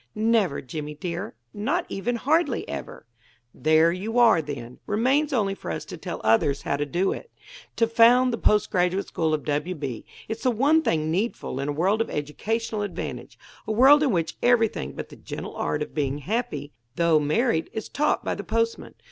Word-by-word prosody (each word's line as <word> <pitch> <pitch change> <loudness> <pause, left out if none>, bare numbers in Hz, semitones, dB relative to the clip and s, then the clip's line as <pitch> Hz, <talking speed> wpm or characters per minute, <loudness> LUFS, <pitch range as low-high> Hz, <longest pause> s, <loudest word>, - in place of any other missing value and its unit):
"Never, 215 -8 +2
Jimmy, 150 +3 -6
dear; 170 -3 -5 0.2
not 285 - -1
even 235 +5 -2
hardly 310 +9 +1
ever." - - -7 0.5
"There 155 +2 +4
you 205 +7 -3
are, 230 -8 +6
then. 125 -5 -7
Remains 265 +8 +2
only 205 -7 +1
for 195 - -8
us 80 - -4
to - - -8
tell - - -6
others 115 +5 +2
how - - 0
to 145 0 -2
do 180 +6 0
it; 475 - -9 0.5
to 230 - +3
found 235 +2 +5
the 230 - -2
Post 210 -1 +2
Graduate 180 +2 +1
School 160 -1 0
of 155 -2 -1
W. 150 +5 -1
B. 135 -7 -5 0.2
It's 225 +1 -5
the 255 - +2
one 280 +7 +3
thing 155 - 0
needful 190 - -2
in 140 +1 -2
a - - -1
world 190 +8 +1
of - - -2
educational 215 +9 -3
advantage; 205 -2 -5 0.3
a - - -1
world 270 +7 +7
in 295 - +3
which 165 -5 -1
everything 225 - +2
but - - -7
the - - -12
gentle - - -7
art 75 - -1
of - - -10
being 140 -2 -1
happy, 150 - -3 0.2
though 165 -1 +4
married, 160 - +1
is 220 - -5
taught 300 +1 0
by - - 0
the - - -5
postman. 230 0 -2
195 Hz, 190 wpm, -25 LUFS, 150-230 Hz, 0.5 s, world